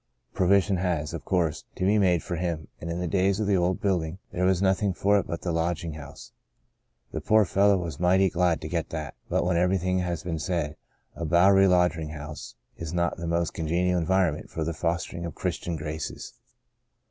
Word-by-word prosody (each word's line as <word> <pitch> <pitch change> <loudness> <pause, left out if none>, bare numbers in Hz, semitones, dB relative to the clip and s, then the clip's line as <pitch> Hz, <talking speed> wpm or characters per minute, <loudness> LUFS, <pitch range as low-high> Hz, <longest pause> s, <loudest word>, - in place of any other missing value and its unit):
Provision 95 +1 +3
has, 85 -5 -1
of - - -5
course, 85 -5 0
to 90 - -1
be 105 +2 +4
made 90 -4 +3
for 90 - -3
him, 85 -2 -3
and 85 - -6
in 85 +1 -3
the 90 - -2
days 95 +2 +1
of 110 - 0
the 100 -1 +2
old 90 0 +1
building 90 -4 -1
there 90 +1 0
was 95 -1 +3
nothing 95 0 +1
for 100 +2 +3
it - - -4
but 85 - -5
the 90 - -1
lodging 85 0 -1
house. 75 -2 -10 0.8
The - - -4
poor 110 -1 +4
fellow 100 +2 +3
was 85 -4 -5
mighty 95 +2 +4
glad 90 -2 +1
to 80 - -5
get 85 0 -2
that, 75 -5 -5 0.2
but - - +1
when 90 -1 +1
everything 90 +1 +1
has 90 -2 -2
been 85 -3 -3
said, 80 -4 -2 0.4
a 85 - -5
Bowery 95 +4 +5
lodging 90 -4 +2
house 75 0 -8 0.2
is 85 +1 -5
not 85 0 0
the 85 - -5
most 85 -1 0
congenial 90 +3 0
environment 85 -2 +1
for 80 - -3
the 85 +2 -2
fostering 85 +1 -2
of 85 -3 -5
the - - -21
Christian 85 - -2
graces. 75 -1 -5
85 Hz, 205 wpm, -26 LUFS, 80-95 Hz, 0.8 s, Bowery